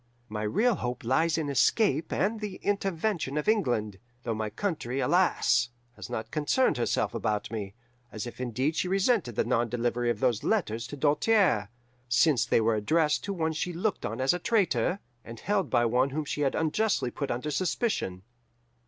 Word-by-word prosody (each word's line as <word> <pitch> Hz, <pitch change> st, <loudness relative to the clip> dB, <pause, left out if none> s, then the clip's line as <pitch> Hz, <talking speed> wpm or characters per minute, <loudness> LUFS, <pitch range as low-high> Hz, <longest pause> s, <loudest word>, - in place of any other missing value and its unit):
My 105 Hz, 0 st, -4 dB
real 215 Hz, -, +2 dB
hope 125 Hz, 0 st, -4 dB
lies 155 Hz, +7 st, +2 dB
in 160 Hz, -2 st, -1 dB
escape 145 Hz, -, +2 dB
and 215 Hz, +3 st, 0 dB
the 210 Hz, -3 st, -5 dB
intervention 195 Hz, -6 st, -1 dB
of 150 Hz, -, -2 dB
England, 120 Hz, -, +1 dB, 0.2 s
though 115 Hz, -, -1 dB
my 110 Hz, -1 st, -3 dB
country, 135 Hz, -, -3 dB
alas! 135 Hz, -8 st, +2 dB, 0.3 s
has -, -, -9 dB
not 110 Hz, -2 st, -5 dB
concerned 155 Hz, -, +1 dB
herself 120 Hz, -, 0 dB
about 105 Hz, -2 st, -2 dB
me, 100 Hz, -3 st, -5 dB, 0.4 s
as 110 Hz, -, -5 dB
if 120 Hz, +1 st, -8 dB
indeed 130 Hz, +5 st, -1 dB
she 180 Hz, -, 0 dB
resented 190 Hz, -, +1 dB
the -, -, +2 dB
non 120 Hz, 0 st, 0 dB
delivery 120 Hz, +1 st, -1 dB
of 115 Hz, -3 st, -1 dB
those 120 Hz, -3 st, +1 dB
letters 115 Hz, -, 0 dB
to 145 Hz, -, -8 dB
Doltaire, 150 Hz, -, +2 dB, 0.4 s
since 125 Hz, 0 st, +3 dB
they -, -, +3 dB
were 115 Hz, +1 st, +2 dB
addressed 150 Hz, +9 st, +1 dB
to 200 Hz, -, -3 dB
one 160 Hz, -3 st, -1 dB
she 175 Hz, +3 st, -3 dB
looked 190 Hz, +5 st, -2 dB
on 110 Hz, +3 st, -4 dB
as 130 Hz, +4 st, +3 dB
a 180 Hz, -, -2 dB
traitor, 200 Hz, -3 st, +1 dB, 0.3 s
and 115 Hz, 0 st, -10 dB
held 200 Hz, -2 st, 0 dB
by 120 Hz, -, +3 dB
one 125 Hz, +4 st, +2 dB
whom 150 Hz, +2 st, -3 dB
she 145 Hz, -, -3 dB
had 135 Hz, -2 st, +1 dB
unjustly 160 Hz, -, 0 dB
put 140 Hz, +2 st, -4 dB
under 125 Hz, +6 st, -2 dB
suspicion. 165 Hz, -, -1 dB
135 Hz, 180 wpm, -28 LUFS, 115-180 Hz, 0.4 s, since